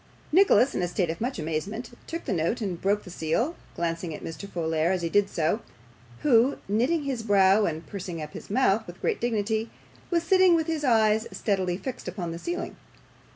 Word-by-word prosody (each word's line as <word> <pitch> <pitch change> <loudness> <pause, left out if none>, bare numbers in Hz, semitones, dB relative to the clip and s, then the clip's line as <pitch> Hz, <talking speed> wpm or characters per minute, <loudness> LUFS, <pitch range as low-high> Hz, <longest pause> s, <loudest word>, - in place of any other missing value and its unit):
Nicholas, 315 -6 +5
in - - -1
a 175 - +1
state 175 -1 0
of 165 - -8
much 250 +3 -2
amazement, 190 +10 -3 0.2
took 330 +1 -5
the - - -1
note 170 +8 0
and 190 -6 -3
broke 205 +2 +1
the 180 - -10
seal, 180 - -1 0.2
glancing 165 -1 -2
at - - -10
Mr. 165 +4 -6
Folair 165 -1 0
as 185 -2 -1
he 170 - 0
did 205 +2 +3
so, 165 +6 0 0.6
who, 255 0 +4
knitting 250 - +1
his 265 -4 -2
brow 200 -1 +4
and 160 -2 -3
pursing 180 -1 -6
up 150 -1 -7
his - - -9
mouth 220 -1 +2
with 175 +1 -10
great - - -1
dignity, 220 -1 0 0.4
was 340 -2 +1
sitting 370 0 +5
with 325 -1 +1
his 320 -2 -2
eyes 220 -3 +3
steadily 185 -4 -1
fixed 255 +1 -6
upon 180 -2 -4
the 165 - -6
ceiling. 345 - -4
205 Hz, 200 wpm, -27 LUFS, 170-245 Hz, 0.6 s, Nicholas